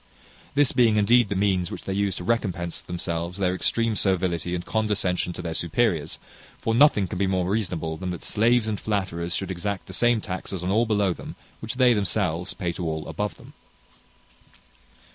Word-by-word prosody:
This 145 -2 +4
being 115 -3 +4
indeed 115 +1 +4
the 100 - -1
means 95 -3 +1
which - - -7
they 95 - -3
use 100 -2 0
to - - -6
recompense 90 -6 -1
to - - -27
themselves 85 0 -3
their 90 -2 +1
extreme 115 +4 +1
servility 90 -3 0
and 85 - -5
condescension 105 -5 0
to - - -7
their 85 - -3
superiors; 85 -2 0 0.4
for 115 - -1
nothing 115 -6 +5
can 90 - -5
be 100 - +2
more 95 -2 0
reasonable, 90 -6 -1
than 90 +1 -4
that 90 -2 -5
slaves 115 +1 +2
and 105 -2 -2
flatterers 90 -5 -2
should 95 -1 -3
exact 95 +2 -3
the - - -10
same 120 -1 +3
taxes 95 -2 -5
on 90 - 0
all 115 +3 +3
below 100 -4 +2
them, - - -9 0.2
which 110 +3 -5
they 125 -1 +5
themselves 90 -4 0
pay 90 -3 -2
to 90 - -6
all 80 -1 -3
above 105 -1 -3
them. - - -15
95 Hz, 190 wpm, -25 LUFS, 90-110 Hz, 0.4 s, nothing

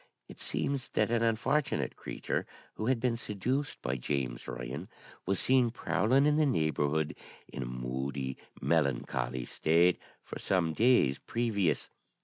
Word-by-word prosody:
It - - -12
seems 140 -2 -2
that - - +1
an 120 -1 +2
unfortunate 115 +6 +1
creature, - - -3 0.3
who 110 - -3
had 130 -2 +2
been 120 -1 +1
seduced 120 +6 -2
by 65 +2 -1
James 65 +1 -2
Ryan, 65 +7 -5 0.4
was 95 -1 +2
seen 130 -2 +4
prowling 125 +3 +2
in 150 0 +4
the 155 - +4
neighbourhood 80 - +1 0.3
in - - -6
a - - -3
moody, 65 +2 -3 0.2
melancholy 65 -5 0
state 85 +3 +3 0.2
for - - -7
some 85 -4 +1
days 115 - +4
previous. 100 -9 0
90 Hz, 135 wpm, -31 LUFS, -, 0.4 s, seen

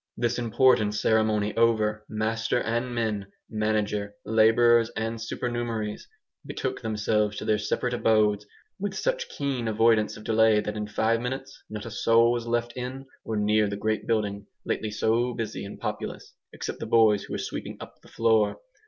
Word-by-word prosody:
This 120 0 0
important 115 -2 +3
ceremony 105 -1 +1
over, 110 -2 +2
master 115 +2 0
and 120 +2 -2
men, 105 -4 -1 0.2
manager, 105 -1 -1
labourers 115 +1 +4
and 115 +1 -2
supernumeraries, 115 -2 -3 0.4
betook - - -4
themselves 105 -1 0
to - - -5
their 110 -1 +2
separate 125 +3 -1
abodes, 105 -3 +2 0.3
with 200 0 -3
such - - -1
keen 135 -5 -2
avoidance 110 0 +3
of 105 - -11
delay 110 -1 +4
that 105 0 -3
in 105 -1 -3
five 110 +2 +1
minutes 135 +2 -5
not 105 -1 -6
a 115 - -6
soul 115 +1 +4
was 120 -1 -2
left 120 0 -1
in 130 +2 -5 0.2
or 110 - -3
near 105 0 +2
the 100 - -4
great 110 +1 -1
building 100 -3 -1 0.2
lately 110 - -2
so 115 +3 0
busy 110 -3 -4
and 100 - -8
populous, - - -5 0.2
except - - -6
the - - -5
boys 110 -3 +4
who - - -5
were - - -1
sweeping - - -5
up - - -11
the - - -18
floor. 110 -2 +2
110 Hz, 165 wpm, -26 LUFS, 105-120 Hz, 0.4 s, labourers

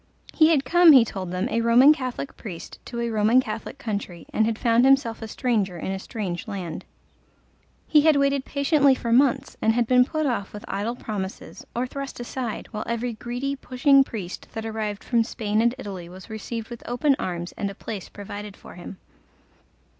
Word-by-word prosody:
He 315 -1 +5
had 285 -5 +3
come, 345 +3 +7
he 255 -4 +8
told 190 -4 -5
them, 180 +1 -1
a 230 - 0
Roman 245 +6 +7
Catholic 255 -1 -5
priest 180 -7 -9
to 235 - -6
a 235 0 -1
Roman 220 +3 +4
Catholic 225 +1 -4
country, 200 - -5
and 220 - +2
had 225 -1 -1
found 235 0 +3
himself 265 -4 +3
a 225 - -5
stranger 210 -6 -1
in 190 - -4
a 195 - -3
strange 190 -4 -5
land. 185 -6 -5 1.0
He 300 - +5
had 310 0 +5
waited 280 -1 +2
patiently 280 0 +3
for 235 -2 -1
months, 260 0 +2
and 220 - +3
had 240 0 +2
been 250 +2 +5
put 310 +4 -2
off 235 -7 -2
with 210 - -8
idle 205 +5 -2
promises 200 -5 -6
or 240 +2 0
thrust 275 +1 -6
aside, 240 -1 -4
while 215 -2 -4
every 235 +1 -2
greedy 245 +5 -3
pushing 275 +1 +4
priest 195 -8 -7
that 225 0 -5
arrived 215 -2 -4
from 235 -2 +2
Spain 215 -2 -1
and 235 +2 +2
Italy 190 -8 -7
was 185 +5 -12
received 220 +1 -5
with 240 -1 -8
open 270 +4 +2
arms 175 -1 -4
and 200 - -3
a 195 - -9
place 200 -3 -7
provided 205 0 -8
for - - -13
him. 180 +2 -9
230 Hz, 190 wpm, -24 LUFS, 205-260 Hz, 1.0 s, he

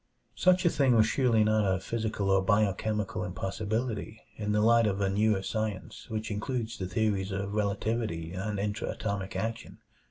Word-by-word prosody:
Such 185 0 +3
a - - +6
thing 135 -4 +3
was 110 -1 +6
surely 115 -1 +3
not 110 0 +3
a 95 -2 +1
physical 105 -1 -2
or 95 0 +4
biochemical 105 0 0
impossibility 110 +2 -3 0.2
in 105 -1 -2
the 105 - +2
light 115 0 +5
of 100 -1 -1
a 100 -1 +1
newer 105 -1 +2
science 110 0 -4
which 110 0 -3
includes 115 +2 -3
the 95 - -2
theories 100 -2 0
of 100 +1 -3
relativity 100 -4 -1
and 100 +3 -3
intra 105 +2 -2
atomic 100 -2 -3
action. 115 -3 -4
105 Hz, 165 wpm, -29 LUFS, 100-110 Hz, 0.2 s, a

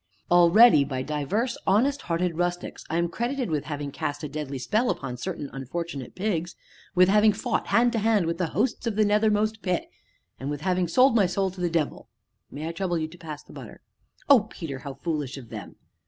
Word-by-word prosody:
"Already, 175 0 +7
by 130 -2 -3
divers 180 - -2
honest 260 +9 +3
hearted 170 0 -1
rustics, 175 +1 -3
I 165 - 0
am 170 0 +2
credited 240 +4 -2
with 150 -2 -1
having 145 -2 -4
cast 145 +2 -4
a - - -2
deadly 145 -1 -5
spell 215 - 0
upon 130 -3 -3
certain 160 +1 -4
unfortunate 135 0 -5
pigs, 180 -3 -2 0.4
with 180 0 +6
having 210 +2 +5
fought 245 +2 -2
hand 240 +1 +3
to 230 - 0
hand 215 -4 +2
with 165 +1 -2
the 180 - +1
hosts 230 +7 -1
of 225 - -1
the 215 0 +3
nethermost 215 +1 +2
pit, 180 -3 -2 0.5
and 135 - -4
with 145 0 -4
having 180 0 +1
sold 255 +8 +4
my 200 -5 +4
soul 190 +1 -1
to 185 0 -9
the 175 - +1
devil 165 -3 -2 0.4
may 150 +3 -6
I - - -2
trouble 175 0 -1
you 155 -1 -2
to 175 - -14
pass 155 -3 -8
the - - -16
butter?" - - -10 0.5
"Oh, 245 -7 +6
Peter, 145 -9 -6
how 135 0 -7
foolish 145 -3 -3
of 125 -4 -10
them!" - - -8
175 Hz, 205 wpm, -26 LUFS, 150-210 Hz, 0.5 s, Already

